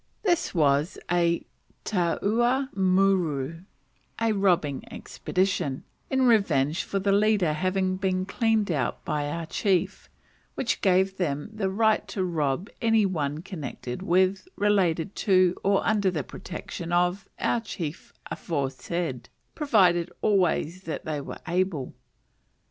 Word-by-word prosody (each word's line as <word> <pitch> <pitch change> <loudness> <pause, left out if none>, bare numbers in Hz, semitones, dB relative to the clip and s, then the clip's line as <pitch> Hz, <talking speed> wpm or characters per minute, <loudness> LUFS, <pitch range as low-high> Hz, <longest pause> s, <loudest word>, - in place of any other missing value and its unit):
This 345 - +1
was 145 +1 +2
a 170 -1 +2 0.4
taua 230 +8 +1
muru 185 -6 +2 0.6
(a 225 -1 +2
robbing 175 -8 +1
expedition) 185 -8 -2 0.3
in 265 -1 +2
revenge 170 - +3
for 200 - -3
the 195 +1 +1
leader 200 -5 +3
having 185 +3 0
been 185 -1 0
cleaned 220 -1 +1
out 135 -6 -2
by 145 -1 -1
our 165 +2 -3
chief, 185 +2 -1 0.5
which 240 - -1
gave 190 0 +2
them 150 +1 -2
the 205 -3 -1
right 220 +2 +2
to 190 - -2
rob 160 -1 -1
any 225 -2 +4
one 155 -4 -2
connected 145 -7 -6
with, 190 - +2
related 195 -4 +1
to, 185 -2 +3
or 200 0 +2
under 205 -3 +2
the 160 -6 -2
protection 170 +7 -7
of, 180 +3 +1
our 240 - +1
chief 170 -7 -6
aforesaid, 140 -2 -3 0.2
provided 180 - +3
always 185 -3 +1
that 160 - -5
they 150 -2 -2
were - - -7
able. 175 -6 -1
185 Hz, 125 wpm, -26 LUFS, 160-200 Hz, 0.6 s, any